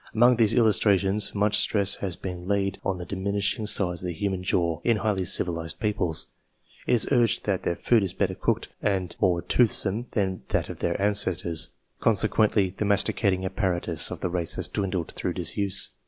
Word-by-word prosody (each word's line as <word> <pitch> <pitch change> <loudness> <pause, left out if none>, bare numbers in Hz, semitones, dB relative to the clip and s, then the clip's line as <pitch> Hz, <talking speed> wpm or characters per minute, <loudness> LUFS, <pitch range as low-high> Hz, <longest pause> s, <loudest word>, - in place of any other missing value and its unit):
Among 120 +2 +5
these 115 -1 +3
illustrations 105 -3 +2
much 105 +1 +3
stress 100 -2 +3
has 95 -4 -4
been 90 -1 -7
laid 100 -1 -1
on 95 -2 -2
the 90 - -7
diminishing 100 +2 -2
size 90 -4 -1
of 90 - -5
the 90 - -3
human 95 +2 -3
jaw, 85 -2 -1
in 115 -2 +2
highly 105 -3 -1
civilized 85 -3 +1
peoples. 105 -7 +1 0.6
It - - +2
is 115 - +5
urged 120 -4 +2
that 95 -3 -1
their 85 - -2
food 115 +4 +2
is 95 -2 -3
jtter 95 -2 -2
cooked - - -1
and 95 -3 -2
more 85 -2 +1
toothsome 115 -1 +1
than 95 -3 -1
that - - -1
of - - -8
their - - -1
icestors, 95 -5 +1 0.3
consequently 105 -3 +2
the - - -3
masticating 100 -1 +1
apparatus 90 -4 0
of - - -7
the 90 - -2
has 85 -2 +2
dwindled 95 -4 -3
through - - -4
disuse. 100 -2 -1
100 Hz, 175 wpm, -25 LUFS, 90-105 Hz, 0.6 s, Among